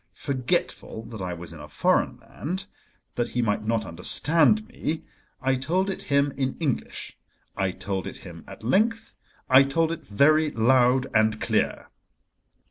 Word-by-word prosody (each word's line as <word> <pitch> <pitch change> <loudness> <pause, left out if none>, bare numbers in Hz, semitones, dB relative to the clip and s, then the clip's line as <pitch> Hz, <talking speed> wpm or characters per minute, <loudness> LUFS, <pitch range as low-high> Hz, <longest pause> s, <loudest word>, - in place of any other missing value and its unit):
Forgetful 130 -4 -2
that 110 -3 -7
I 90 -1 -3
was 85 0 -9
in 80 - -11
a 75 - -9
foreign 75 - +1
land—that 180 -8 -7
he 125 - 0
might 105 -1 0
not 115 -1 +1
understand 160 - +2
me—I 155 - -4
told 175 +9 0
it - - -5
him 140 0 +1
in 130 -1 -1
English, 145 -7 -3 0.4
I 95 -1 0
told 95 +1 -4
it - - -6
him - - -11
at - - -11
length, 215 - +1 0.3
I 130 +1 +8
told 160 +4 +1
it 165 -1 -5
very 155 +8 +4
loud 125 +1 +3
and 110 -1 +3
clear. - - -1
130 Hz, 145 wpm, -25 LUFS, 110-155 Hz, 0.4 s, I